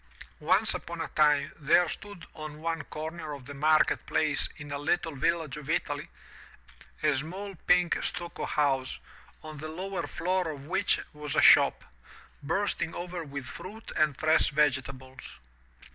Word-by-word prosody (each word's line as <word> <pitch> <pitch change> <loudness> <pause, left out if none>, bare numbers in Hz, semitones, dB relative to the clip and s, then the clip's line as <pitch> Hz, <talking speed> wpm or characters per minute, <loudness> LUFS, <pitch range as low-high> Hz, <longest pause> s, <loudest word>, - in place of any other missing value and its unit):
Once - - +3
upon 170 0 -6
a 165 - -3
time 150 -2 +3
there 165 +4 +4
stood 200 -2 -8
on 155 -1 -8
one 165 0 -2
comer 155 0 -6
of 140 -3 -9
the 145 - -8
market 155 +2 +3
place 150 -4 +1
in 145 -1 -9
a 140 - -2
little 165 +2 0
village 155 0 0
of 150 - -9
Italy, - - -1 1.0
a 150 -1 +4
small 185 +9 -4
pink 180 -1 +4
stucco 175 -1 -4
house, 135 -3 0 0.5
on 155 -1 -8
the 155 - -5
lower 185 +4 -4
floor 185 -1 -1
of 140 -3 -7
which 190 +5 +1
was 150 -1 -5
a - - +4
shop, - - +7 0.6
bursting 170 +1 -1
over 175 -1 -5
with 140 -3 -6
fruit 210 - -8
and 155 -3 +2
fresh 155 +1 +3
vegetables. 130 -3 -1
155 Hz, 150 wpm, -29 LUFS, 145-170 Hz, 1.0 s, shop